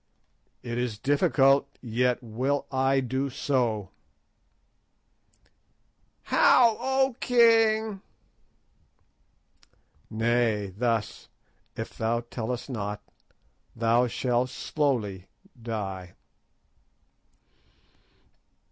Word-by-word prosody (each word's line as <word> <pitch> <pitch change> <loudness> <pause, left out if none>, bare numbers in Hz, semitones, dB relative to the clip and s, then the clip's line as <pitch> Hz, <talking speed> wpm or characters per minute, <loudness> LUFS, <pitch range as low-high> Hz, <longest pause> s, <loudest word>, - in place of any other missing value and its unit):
"It 120 -1 -4
is 120 -4 -2
difficult, 140 +2 +2
yet 125 +1 0
will 130 +5 -2
I 135 0 +2
do 130 +2 -2
so." 120 -8 -1 2.3
"How, 235 -3 +5
O 265 -1 +1
king?" 225 -4 +3 2.1
"Nay, 110 -3 0
thus; 115 -1 -2 0.5
if - - -6
thou 115 +1 0
tellest 120 0 -5
not 105 -5 -5 0.7
thou 115 +2 +2
shalt 125 +1 0
slowly 115 - -2 0.3
die." 95 -6 -5
125 Hz, 65 wpm, -27 LUFS, 110-140 Hz, 2.3 s, How